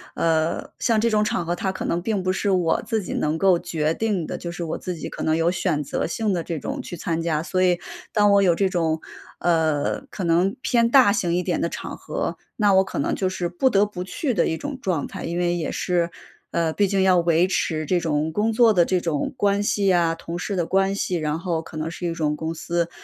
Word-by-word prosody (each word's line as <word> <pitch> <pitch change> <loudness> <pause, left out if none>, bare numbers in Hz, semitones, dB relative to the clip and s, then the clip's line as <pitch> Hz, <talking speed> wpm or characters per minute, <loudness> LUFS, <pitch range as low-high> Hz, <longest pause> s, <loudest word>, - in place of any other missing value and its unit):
呃， 160 0 0
像 225 -2 +2
这 230 0 +2
种 210 0 +3
场 190 -4 -1
合 175 +1 -1
它 190 +1 -2
可 185 - -5
能 170 - 0
并 200 -2 -1
不 185 0 +1
是 200 - -1
我 180 -4 +2
自 220 -3 0
己 - - -5
能 155 +1 0
够 185 -1 +4
决 155 -1 -1
定 205 -6 -1
的， - - -5
就 170 - -5
是 175 0 -5
我 165 - -3
自 180 - -4
己 160 - -6
可 - - -8
能 160 0 +2
有 165 +1 +2
选 170 -5 0
择 - - -2
性 210 +3 -1
地 170 -2 -1
这 165 - -4
种 275 - -4
去 175 -8 -8
参 165 0 -2
加， 160 -2 0
所 185 +1 -1
以 180 -1 +3 0.3
当 205 -2 +4
我 200 0 +5
有 175 -3 +4
这 195 +1 +2
种， 165 -3 0 0.4
呃， 160 - +1
可 190 - -6
能 175 +4 +2
偏 235 -1 +3
大 245 -5 +6
型 180 -5 0
一 180 - 0
点 - - -1
的 - - 0
场 - - -6
合， - - -4 0.2
那 205 -3 +3
我 190 0 +6
可 - - -7
能 140 - 0
就 190 -1 0
是 180 -2 -2
不 180 +10 +1
得 205 -3 +4
不 180 -3 -6
去 255 - -2
的 175 - +2
一 160 - -1
种 285 - -5
状 170 -7 -1
态。 - - -7
因 170 +1 -3
为 175 0 +1
也 165 - -2
是 175 -2 0 0.4
呃， 165 -1 +1
毕 200 -1 +2
竟 195 0 +1
要 185 -1 +5
维 170 0 +3
持 155 -4 -1
这 180 +3 +1
种 155 -1 -1
工 215 +5 0
作 230 -1 +5
的 175 -3 +4
这 185 -1 +1
种 155 -5 -1
关 200 -1 +2
系 200 -2 +2
啊， 165 -2 +2
同 170 +1 -6
事 200 +2 -3
的 175 -2 0
关 195 +2 +1
系， 185 -3 -1
然 155 0 -1
后 170 -2 -1
可 160 - -12
能 155 +1 -3
是 175 +1 -4
一 170 - -1
种 150 -2 -1
公 160 +1 -3
司， 170 +1 -1
175 Hz, 270 characters per minute, -23 LUFS, 165-195 Hz, 0.4 s, 大